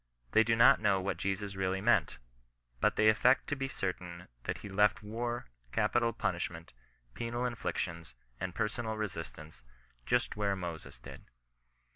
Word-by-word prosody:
They 110 Hz, -, +6 dB
do 115 Hz, +1 st, +2 dB
not 115 Hz, -, +7 dB
know 100 Hz, -3 st, +3 dB
what 95 Hz, +1 st, -2 dB
Jesus 100 Hz, +1 st, -2 dB
really 95 Hz, 0 st, 0 dB
meant, 110 Hz, -1 st, +3 dB, 0.6 s
but -, -, +2 dB
they 110 Hz, -, +4 dB
affect 125 Hz, +4 st, +5 dB
to 145 Hz, -, 0 dB
be 135 Hz, -1 st, -2 dB
certain 90 Hz, -6 st, -4 dB, 0.2 s
that -, -, -2 dB
he -, -, -4 dB
left 105 Hz, +2 st, +2 dB
war, 120 Hz, +3 st, -3 dB, 0.3 s
capital 120 Hz, -1 st, +2 dB
punishmeiU, 85 Hz, -6 st, -3 dB, 0.5 s
penal 120 Hz, +1 st, -2 dB
inflictions, 85 Hz, -, -3 dB, 0.2 s
and 95 Hz, -1 st, -4 dB
per 110 Hz, -, +1 dB
sonal 110 Hz, 0 st, -4 dB
resistance, 80 Hz, -, -6 dB, 0.5 s
just 120 Hz, +1 st, +1 dB
where 100 Hz, -2 st, 0 dB
Moses 85 Hz, -4 st, -6 dB
did. -, -, -11 dB
105 Hz, 150 wpm, -32 LUFS, 95-115 Hz, 0.6 s, not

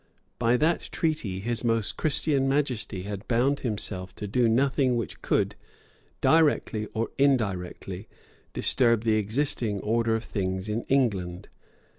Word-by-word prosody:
By 120 Hz, +1 st, +3 dB
that 160 Hz, +5 st, +1 dB
treaty 135 Hz, -, -1 dB
His 120 Hz, +3 st, -2 dB
Most 115 Hz, -3 st, 0 dB
Christian 140 Hz, -3 st, +1 dB
Majesty 125 Hz, -9 st, -1 dB
had 100 Hz, +1 st, -6 dB
bound 130 Hz, +4 st, +2 dB
himself 95 Hz, -5 st, -3 dB
to 105 Hz, -, -6 dB
do 115 Hz, +3 st, +2 dB
nothing 130 Hz, +1 st, +2 dB
which 115 Hz, -4 st, -4 dB
could, -, -, +1 dB, 0.7 s
directly 145 Hz, -9 st, +3 dB
or 115 Hz, +1 st, -1 dB
indirectly, 100 Hz, -7 st, 0 dB, 0.4 s
disturb 115 Hz, -3 st, +2 dB
the 110 Hz, -1 st, +3 dB
existing 110 Hz, -1 st, -1 dB
order 115 Hz, +1 st, +1 dB
of 110 Hz, -, -3 dB
things 95 Hz, -2 st, -3 dB
in 110 Hz, +2 st, -2 dB
England. 100 Hz, -10 st, 0 dB
115 Hz, 130 wpm, -27 LUFS, 100-135 Hz, 0.7 s, By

